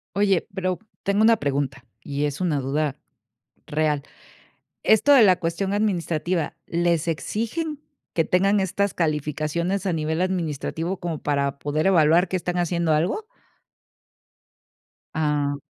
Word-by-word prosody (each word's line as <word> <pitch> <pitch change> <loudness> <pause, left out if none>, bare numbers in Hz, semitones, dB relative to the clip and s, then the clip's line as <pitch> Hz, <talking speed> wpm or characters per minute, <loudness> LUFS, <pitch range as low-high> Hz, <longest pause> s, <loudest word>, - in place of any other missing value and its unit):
Oye, 195 -3 +2
pero 185 -2 -1 0.2
tengo 200 +2 +2
una 225 +1 +6
pregunta 135 -4 -2 0.2
y 145 +1 -2
es 145 +2 -2
una 165 -6 +1
duda 140 +1 -1 0.7
real. 150 -1 0 0.8
Esto 220 +7 +5
de 255 -5 +8
la 185 -3 +6
cuestión 185 +4 -2
administrativa, 175 -5 -1
¿les 170 -1 0
exigen 255 - -3 0.3
que 165 - +2
tengan 195 +3 +3
estas 200 +1 0
calificaciones 155 +4 -1
a 185 - +1
nivel 160 +1 -1
administrativo 170 0 -2
como 165 -3 -4
para 140 -1 -1
poder 155 +5 0
evaluar 170 0 +5
que 185 - -1
están 180 +1 -3
haciendo 170 -2 +1
algo? 185 - 0 1.9
Ah. 150 -2 0
170 Hz, 125 wpm, -24 LUFS, 150-190 Hz, 1.9 s, de